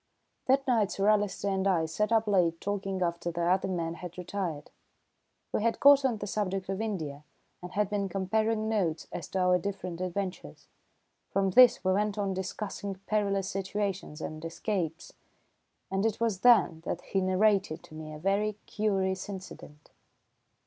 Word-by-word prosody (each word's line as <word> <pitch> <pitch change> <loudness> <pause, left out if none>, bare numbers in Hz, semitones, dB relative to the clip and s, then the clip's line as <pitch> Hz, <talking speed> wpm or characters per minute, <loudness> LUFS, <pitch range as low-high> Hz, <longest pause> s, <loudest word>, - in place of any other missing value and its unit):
That 270 +1 +3
night 225 -6 +3
Sir 200 +1 0
Alister 205 -1 +1
and 190 0 0
I 170 -4 +2
sat 210 +8 -1
up 225 -1 +3
late 175 -5 +2
talking 195 -2 -2
after 170 0 -2
the 170 0 -2
other 185 +3 +2
men 170 -3 -2
had 175 0 -9
retired. 180 -4 -4 0.8
We - - +1
had 230 +1 +1
got 280 0 +7
on 250 -4 +1
the 205 - -5
subject 195 -2 -2
of 195 +2 -2
India 155 -10 -4 0.4
and 180 +1 -8
had 210 0 +1
been 200 -2 -1
comparing 215 +4 0
notes 180 -8 -1
as 170 - -5
to 190 - -2
our 180 0 +4
different 185 -2 -5
adventures. 185 - -4 0.6
From 195 0 +1
this 250 -2 +7
we 185 - +3
went 210 +1 0
on 200 -1 0
to - - -1
discussing 195 +1 -4
perilous 200 -2 0
situations 195 -4 -3
and 155 0 -6
escapes, 165 -1 -3 0.8
and 195 +1 0
it 220 -1 0
was 225 -5 0
then 205 -8 +5
that 175 - -3
he 195 - -1
narrated 185 -3 +2
to - - -15
me 155 0 -8
a 155 - -7
very 200 +5 +1
curious 195 -2 -1
incident. 185 -6 -10
195 Hz, 170 wpm, -29 LUFS, 180-210 Hz, 0.8 s, got